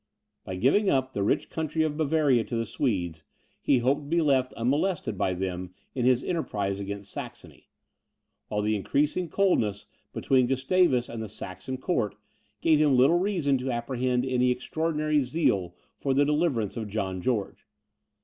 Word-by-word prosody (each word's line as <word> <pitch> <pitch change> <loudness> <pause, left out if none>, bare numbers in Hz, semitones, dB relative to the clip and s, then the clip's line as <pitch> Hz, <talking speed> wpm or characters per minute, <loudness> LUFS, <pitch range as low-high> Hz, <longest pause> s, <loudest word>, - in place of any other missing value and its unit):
By 95 - -5
giving 145 - +3
up 130 -1 +1
the 100 - -2
rich 100 - 0
country 160 0 -1
of 155 -2 -1
Bavaria 150 -5 +2
to 120 - -4
the 115 0 -1
Swedes, 90 - -2 0.4
he 140 - +3
hoped 130 +4 +1
to - - -10
be 170 +3 +2
left 135 -5 +2
unmolested 135 - 0
by 95 -1 0
them 90 -1 -4 0.2
in 125 -2 -1
his 125 0 +3
enterprise 100 - -2
against 100 0 -6
Saxony, - - -9 0.8
while 105 0 -2
the 110 +1 +1
increasing 150 - 0
coldness 115 - +1 0.3
between 130 -2 +2
Gustavus 135 0 +2
and 115 - -6
the 110 - -5
Saxon 95 +6 -6
Court, 130 - -1 0.5
gave 155 -2 +4
him 145 -4 +4
little 140 +7 +5
reason 170 -9 +1
to 130 +1 -3
apprehend 125 +1 -1
any 125 -1 +2
extraordinary 155 +4 0
zeal 125 - 0 0.2
for 135 -1 0
the 145 +1 +4
deliverance 150 - 0
of 110 -2 -4
John 95 -3 -3
George. 110 -2 -2
130 Hz, 160 wpm, -27 LUFS, 105-150 Hz, 0.8 s, little